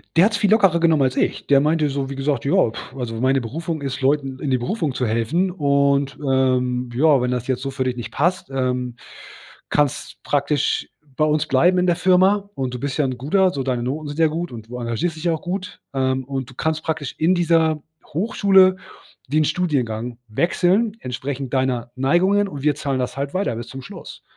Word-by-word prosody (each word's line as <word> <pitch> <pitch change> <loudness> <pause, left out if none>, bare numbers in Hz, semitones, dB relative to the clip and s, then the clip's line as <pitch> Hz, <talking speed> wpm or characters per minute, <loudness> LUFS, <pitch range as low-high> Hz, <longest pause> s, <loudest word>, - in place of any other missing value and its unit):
Der 170 - +6
hat's 210 -1 +1
viel 205 -1 +1
lockerer 195 -6 +4
genommen 165 -3 +3
als 130 -1 +1
ich. - - 0
Der 140 -1 +5
meinte 150 +1 +2
so, 135 -1 -3
wie 140 - -5
gesagt: 135 -1 -1
„Ja, 150 -7 +3 0.2
also 115 -3 -4
meine 130 +1 +2
Berufung 160 +6 -4
ist, 135 -1 -4
Leuten 135 -1 0
in 145 - -3
die 130 - +2
Berufung 155 - -2
zu 125 - -1
helfen 115 - 0
und, 140 -3 +1
ähm, 125 -2 +1
ja, 140 0 +4
wenn 125 0 0
das 125 0 -2
jetzt 130 -1 -1
so 135 - -3
für 130 -1 -2
dich 125 -1 -2
nicht 120 - -6
passt, 175 0 0
ähm, 125 -2 -2 0.7
kannst 145 -3 -1
praktisch 145 0 0 0.3
bei 155 - +3
uns 155 0 +1
bleiben 175 +7 +3
in 180 - +2
der 175 -1 +2
Firma, 190 +3 +3
und 130 -2 -3
du 125 - -5
bist 140 +1 -3
ja 145 - +2
'n 130 -2 -3
guter 185 +8 +2
so 140 - -3
deine 125 -2 -1
Noten 145 +4 -3
sind 145 +2 -6
ja 160 - +5
gut 165 +3 -4
und 110 0 -10
du 125 - -6
engagiert 120 +9 -2
dich 160 +2 -8
ja 170 - +3
auch 160 - -4
gut, 185 +1 -5
ähm, 130 0 0
und 135 -2 -4
du - - -13
kannst 160 -1 -1
praktisch 150 -4 -3
in 175 +4 +3
dieser 165 -3 +2 0.2
Hochschule 190 +1 +3 0.5
den 155 +4 +2
Studiengang 125 -9 -1
wechseln 180 - +1
entsprechend 130 +1 -5
deiner 130 -2 0
Neigungen 185 +10 +2
und 145 -7 -7
wir 150 -1 +2
zahlen 140 -3 -2
das 125 +1 -3
halt 140 0 -3
weiter 190 - 0
bis 120 - -6
zum 135 0 -8
Schluss.“ 125 - -11
140 Hz, 210 wpm, -21 LUFS, 130-165 Hz, 0.7 s, Der